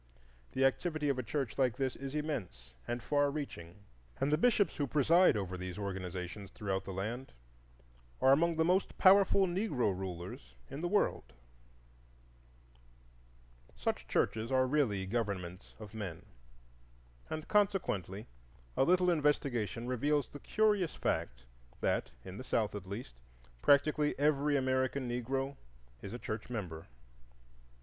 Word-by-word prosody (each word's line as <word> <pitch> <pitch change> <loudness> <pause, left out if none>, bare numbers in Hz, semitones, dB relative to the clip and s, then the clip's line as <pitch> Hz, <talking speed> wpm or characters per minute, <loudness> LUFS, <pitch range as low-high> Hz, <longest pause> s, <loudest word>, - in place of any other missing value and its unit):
The 135 +1 +3
activity 150 +2 +1
of 135 -2 +1
a - - +1
church 130 +1 -3
like 125 -4 +2
this 130 -2 -1
is 135 +1 -6
immense 100 - -4
and 120 0 -3
far 145 +1 +2
reaching, 135 - -6 0.4
and 135 +2 +1
the - - +5
bishops 210 -5 +3
who 145 - 0
preside 155 +2 +5
over 95 -2 -3
these 90 0 -6
organizations 95 0 -5
throughout 95 -2 -3
the - - -5
land 110 +8 -4 0.9
are 130 - +5
among 165 +4 +4
the 160 0 +2
most 185 +3 +1
powerful 195 0 +6
Negro 175 - 0
rulers 85 -9 -7 0.2
in 140 +3 -5
the 175 - 0
world. 195 - 0 2.4
Such - - -2
churches 110 +2 0
are 130 0 +4
really 125 -9 +1
governments 95 -4 -3
of 105 -2 -10
men, 95 -7 -6 1.0
and 155 0 -4
consequently 175 - +1 0.5
a - - +4
little 180 +4 +4
investigation 140 -7 0
reveals 140 +3 +1
the 145 - -9
curious 210 -4 +1
fact - - -2 0.4
that, - - 0 0.2
in 95 +1 -8
the - - -6
South, 110 -4 0
at 100 -2 -6
least, 100 - -6 0.5
practically 150 +1 +3
every 145 0 +3
American 130 0 0
Negro 135 +3 -2 0.4
is 100 - -7
a 120 - -4
church 110 -2 -5
member. 90 -9 -5
130 Hz, 135 wpm, -33 LUFS, 100-150 Hz, 2.4 s, powerful